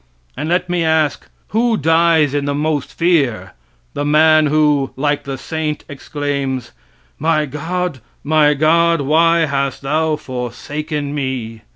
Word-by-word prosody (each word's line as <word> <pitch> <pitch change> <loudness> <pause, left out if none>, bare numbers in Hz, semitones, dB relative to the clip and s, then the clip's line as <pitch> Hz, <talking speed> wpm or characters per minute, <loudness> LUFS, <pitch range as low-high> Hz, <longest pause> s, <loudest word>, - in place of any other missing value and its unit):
And 155 - -4
let 180 +1 +1
me 175 -1 0
ask, 160 -2 0 0.2
who 230 +1 +1
dies 160 -1 +3
in 145 -1 -1
the 145 0 -1
most 150 -1 -1
fear, 135 - +1 0.4
the 145 - -2
man 155 +1 +4
who, 150 -2 +2
like 145 +1 -1
the 135 -1 -4
saint, 155 +1 -4
exclaims: 140 -3 -4 0.5
"My 155 0 +1
God, 160 +2 -3 0.2
my 150 0 +3
God! 165 +2 +3
why 165 +4 +3
hast 140 -1 -2
thou 155 +3 +1
forsaken 145 +4 -5
me?" 130 -6 -4
150 Hz, 135 wpm, -17 LUFS, 140-160 Hz, 0.5 s, man